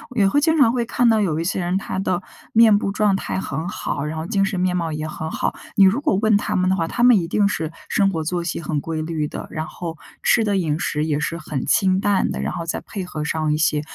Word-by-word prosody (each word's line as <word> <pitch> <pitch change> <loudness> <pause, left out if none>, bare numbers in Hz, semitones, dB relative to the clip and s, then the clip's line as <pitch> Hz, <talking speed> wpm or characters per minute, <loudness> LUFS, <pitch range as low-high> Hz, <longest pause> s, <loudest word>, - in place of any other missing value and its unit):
也 205 - +3
会 285 - +3
经 320 +1 +2
常 230 -6 +5
会 240 -2 -1
看 240 +1 +2
到 220 - +4
有 170 -7 0
一 165 - -1
些 185 +2 -1
人 180 +1 0
他 190 -1 -4
的 185 -1 -1 0.3
面 220 -2 +6
部 195 - -2
状 210 -1 +2
态 - - -4
很 165 -1 -4
好， 145 -4 -3
然 155 +1 -4
后 160 - -4
精 195 0 +1
神 195 -1 -2
面 180 0 +1
貌 165 -2 -2
也 155 0 -3
很 160 0 -5
好。 - - -1 0.2
你 200 - +6
如 195 +8 +5
果 245 - +1
问 215 -2 +4
他 - - -2
们 185 0 +2
的 190 - +2
话， 165 -1 0
他 240 - -1
们 245 -4 +7
一 165 - -3
定 205 +3 +2
是， 160 -5 -2 0.2
生 195 -1 +3
活 160 -4 -2
作 175 +2 -2
息 170 0 -3
很 155 -2 -2
规 160 +1 -4
律 155 -2 -2
的， - - -7
然 155 -1 -4
后 165 -2 -7 0.2
吃 225 -2 +3
的 205 -1 +1
饮 160 -4 0
食 150 0 -1
也 150 -2 0
是 165 +2 -2
很 150 -4 -4
清 190 -1 +3
淡 200 -1 +1
的， - - -4
然 - - -2
后 170 -2 -4
再 165 - -2
配 200 -3 -6
合 155 -4 -5
上 155 0 -1
一 150 - 0
些 150 -2 +1
180 Hz, 295 characters per minute, -21 LUFS, 160-205 Hz, 0.3 s, 们